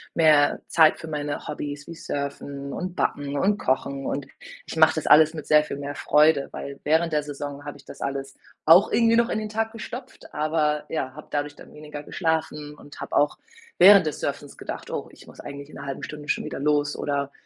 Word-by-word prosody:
mehr 155 -3 +4
Zeit 160 -2 +5
für 165 - -8
meine 150 -1 -4
Hobbys, 145 -1 -5
wie - - -7
Surfen 140 -2 -5
und 180 0 -4
Backen 145 -4 -1
und 200 +6 +2
Kochen 135 +1 -1
und 140 -1 -2 0.4
ich - - -7
mache 160 0 +6
das 155 - -3
alles 155 +1 +7
mit 155 - -6
sehr 150 0 +5
viel 145 - -6
mehr 145 0 -5
Freude, 150 +2 +3
weil 140 0 -7
während 160 +2 +2
der 150 - +2
Saison 145 0 -7
habe 145 -1 -7
ich 140 - -19
das - - -12
alles 135 -1 -4 0.3
auch 170 +5 +7
irgendwie 230 -1 +4
noch 235 0 +3
in - - -1
den 215 0 -5
Tag 225 +1 -1
gestopft, 235 +3 -9
aber 150 -1 0
ja, 130 -5 -3
habe 150 +2 -11
dadurch 145 0 -2
dann - - -14
weniger 150 -1 -8
geschlafen 155 -3 -2
und 145 -1 -14
habe - - -5
auch 145 - +3 0.4
während 195 0 +8
des 150 - -3
Surfens 145 0 -4
gedacht: - - -7
„Oh, - - -4
ich - - -17
muss - - -15
eigentlich 140 0 -8
in - - -13
'ner - - -8
1/2 135 -1 -5
Stunde 150 -1 -8
schon - - 0
wieder - - -5
los,“ 145 0 +1
oder 140 -1 -2
150 Hz, 215 wpm, -25 LUFS, 140-160 Hz, 0.4 s, während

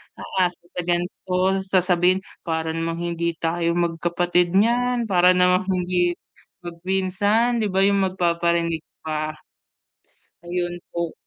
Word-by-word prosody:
aasa 180 -2 -2
sa 180 - -2
ganito. 175 +1 -2 0.3
Sasabihin, 185 -1 +2 0.3
"Para 160 -1 -1
namang 165 +1 -3
hindi 170 -1 -2
tayo 170 0 0
magkapatid 175 +1 +1
niyan. 240 +2 +2
Para 180 -1 +5
namang 180 +2 +3
hindi 180 -1 +1 0.5
magpinsan." 190 +7 0
'Di 215 - +1
ba 190 +1 +2
'yong 200 0 +3
magpaparinig 170 -2 0 0.2
pa? 155 0 -3 1.1
Ayun 175 0 -2 0.2
po. 170 -1 -2
175 Hz, 110 wpm, -23 LUFS, 170-185 Hz, 1.1 s, Para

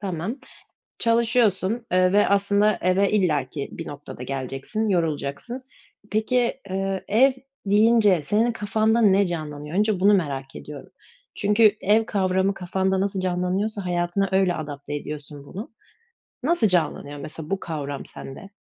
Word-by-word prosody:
Tamam. 195 - -4 0.6
Çalışıyorsun, 230 -2 +2
eee, 185 0 +4
ve 205 0 +4
aslında, 200 +1 +2
eve 185 +2 +3
illaki 150 -9 0
bir 165 - -7
noktada 145 -3 -9
geleceksin, 135 - -3
yorulacaksın. 170 - -2 0.5
Peki, 235 +3 +1 0.2
ııı, 195 0 -1
ev 255 +6 +5 0.3
deyince 210 -3 +4
senin 220 +10 +1
kafanda 220 +1 +1
ne 200 -2 +4
canlanıyor? 150 -2 -5
Önce 210 -3 +2
bunu 205 +2 +5
merak 135 -7 -2
ediyorum. 145 -1 -10 0.4
Çünkü 210 0 +4
ev 215 +3 +3
kavramı 190 -1 +1
kafanda 190 +1 -1
nasıl 195 -1 0
canlanıyorsa 185 +3 -1
hayatına 175 +2 0
öyle 190 -2 +3
adapte 145 -2 -6
ediyorsun 145 -1 -7
bunu. 200 +8 -8 0.7
Nasıl 330 -6 +3
canlanıyor, 155 -5 0
mesela, 155 +2 -7
bu 195 0 -1
kavram 145 -4 -5
sende? 155 +9 -9
190 Hz, 130 wpm, -24 LUFS, 155-210 Hz, 0.7 s, ev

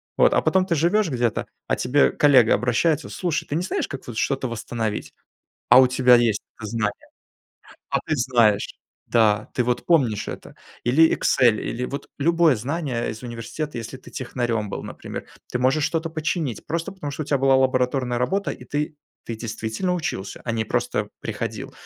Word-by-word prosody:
Вот. - - +4
А - - +4
потом 190 0 +3
ты 170 - +1
живешь 175 +5 +2
где-то, 120 -5 -1 0.2
а - - +2
к - - -13
тебе 140 +3 +3
коллега 130 -6 +5
обращается: 145 +6 +1
"Слушай, 175 -4 -2
ты 145 - -3
не 170 - 0
знаешь, 185 - -2
как 135 - -8
вот 120 - -7
что-то 135 -1 0
восстановить?" 115 -2 -4 0.6
А 125 +2 +10
у 130 - +5
тебя 125 -1 +5
есть 115 -3 +3 0.2
это 110 - -6
знание. 105 -2 -2 0.8
А - - +2
ты 155 - -1
знаешь. 120 -4 +2 0.3
Да, 110 -2 +2
ты 125 - +2
вот 120 0 -1
помнишь 130 -11 +2
это. - - -8 0.3
Или 155 +7 +5
Excel, 120 -4 +3
или 125 +2 -3
вот 140 +3 -5
любое 165 -2 +4
знание 130 0 -2
из 110 - -8
университета, 120 +4 -5
если 115 +3 -6
ты - - -14
технарем 120 - -2
был, - - -5
например. - - -7 0.2
Ты 125 - -2
можешь 135 +4 +2
что-то 165 0 -1
починить 155 - -2
просто 170 +1 -2
потому, 145 -7 -6
что 155 - -4
у - - -6
тебя 140 -1 +1
была 135 0 +4
лабораторная 130 -1 +1
работа 195 +11 0
и - - -8
ты 150 +1 -3 0.3
ты 115 - -5
действительно 110 - -3
учился, 155 - -4
а 120 - -2
не 110 -1 -1
просто - - -1
приходил. - - -5
130 Hz, 185 wpm, -23 LUFS, 115-155 Hz, 0.8 s, А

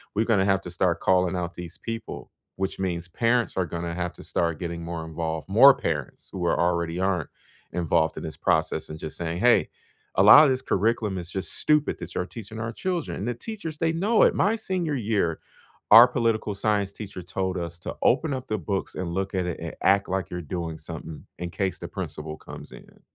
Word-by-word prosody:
We're 110 +2 +2
gonna 105 -5 +3
have 95 -1 +2
to 90 - -7
start 85 -1 +1
calling 90 -1 +2
out 90 0 -3
these 85 -1 -8
people, 115 -1 -6 0.3
which 95 0 -2
means 90 -2 -2
parents 115 +6 0
are 95 - +2
gonna 85 0 -4
have 90 -1 -3
to - - -13
start 85 -2 -1
getting 85 -1 -4
more 85 -1 -5
involved, 80 +1 -4
more 135 +7 +8
parents 75 - -4
who 90 -2 -3
are - - +1
already 85 0 0
aren't 95 -4 0 0.4
involved 85 -2 +1
in - - -5
this 80 -1 -6
process, - - +1
and 80 0 -7
just 80 - -6
saying, 85 0 -3
"Hey, 120 +3 +4 0.5
a - - +4
lot 125 +9 +10
of 140 - +3
this 130 0 0
curriculum 105 -1 0
is 85 0 -6
just 95 - -3
stupid 150 -1 +2
that - - -7
you're 90 - -1
teaching 110 +4 -9
our 110 +1 -3
children." 175 +6 -3
And 105 - -4
the 120 - 0
teachers, 165 - -6
they 165 0 +2
know 205 +7 +2
it. - - +4
My 215 +3 +2
senior 180 -7 -2
year, 105 - 0 0.5
our 115 +3 +10
political 115 -4 0
science 100 -1 0
teacher 100 -4 -8
told 95 +1 -2
us 85 -1 -5
to - - -6
"Open 160 -3 +3
up 130 0 -5
the 110 -1 -1
books 95 +3 -3
and 90 -2 -3
look 95 +1 -2
at 90 -2 -1
it 90 - -4
and - - -6
act 100 +1 +3
like 95 0 -2
you're 90 - -4
doing 85 0 -4
something 80 0 -8
in 90 -1 -4
case 95 +2 -2
the - - -6
principal 75 0 -6
comes - - -11
in." - - -15
95 Hz, 215 wpm, -25 LUFS, 85-115 Hz, 0.5 s, lot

